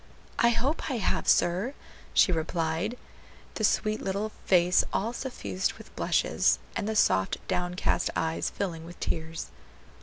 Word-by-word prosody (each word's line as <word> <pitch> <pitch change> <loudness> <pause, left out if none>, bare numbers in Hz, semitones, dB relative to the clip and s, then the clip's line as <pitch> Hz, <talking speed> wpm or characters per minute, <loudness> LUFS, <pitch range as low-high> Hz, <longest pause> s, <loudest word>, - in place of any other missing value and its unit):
"I 235 - +6
hope 255 +8 0
I 265 - -1
have, 215 - 0
sir," 190 +11 +3 0.4
she 185 - +6
replied, 165 +6 -1 0.6
the 220 - -4
sweet 215 0 +2
little 200 +3 -2 0.2
face 180 -1 +5
all 225 +4 -1
suffused 245 -7 -2
with - - -15
blushes, - - +2 0.2
and 210 - -1
the 220 - -1
soft, 95 - +3
downcast 180 0 0
eyes 160 0 0
filling 170 -5 -4
with 170 +1 -11
tears. 160 0 -3
185 Hz, 140 wpm, -28 LUFS, 165-220 Hz, 0.6 s, I